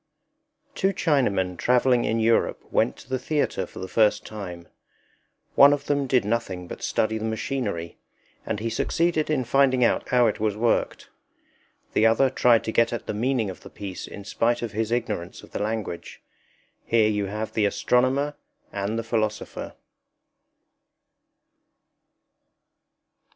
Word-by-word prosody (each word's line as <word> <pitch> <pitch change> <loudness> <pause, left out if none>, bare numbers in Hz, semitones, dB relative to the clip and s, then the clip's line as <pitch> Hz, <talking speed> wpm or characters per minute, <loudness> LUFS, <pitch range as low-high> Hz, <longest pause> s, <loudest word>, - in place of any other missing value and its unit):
Two 195 +1 +1
Chinamen 105 - +1
traveling 125 0 +3
in 115 - 0
Europe 115 +1 +2
went - - +1
to - - -14
the 130 0 -2
theatre 150 +3 -1
for - - -15
the 95 - -5
first 105 +2 +2
time. 90 -5 -8 0.9
One 140 +1 +7
of 145 - -3
them 140 -1 0
did 125 -4 +2
nothing 95 -5 -2
but - - -8
study 110 0 0
the 110 - -4
machinery, 110 -6 -3 0.4
and 105 - -3
he 115 +1 -3
succeeded 165 +6 0
in 145 -4 +1
finding 130 +1 +3
out 115 - +1
how 125 -1 +4
it 110 - 0
was 105 -1 0
worked. 115 +1 0 0.8
The 110 - +4
other 130 +4 +3
tried 120 -3 +4
to 110 - -3
get 115 +1 +3
at 120 - -4
the - - -3
meaning 115 -1 0
of - - -12
the - - -11
piece 95 -2 -7
in 100 - -9
spite 120 +4 0
of 115 - -3
his 110 +1 -2
ignorance 115 -7 -3
of - - -15
the - - -4
language. 105 -5 -4 0.6
Here 115 -2 +3
you 105 -2 0
have 105 +2 -4
the 110 - +2
Astronomer 130 +7 +1 0.4
and 100 +2 -2
the 115 - -2
Philosopher. 110 -2 -3
115 Hz, 150 wpm, -25 LUFS, 105-130 Hz, 0.9 s, One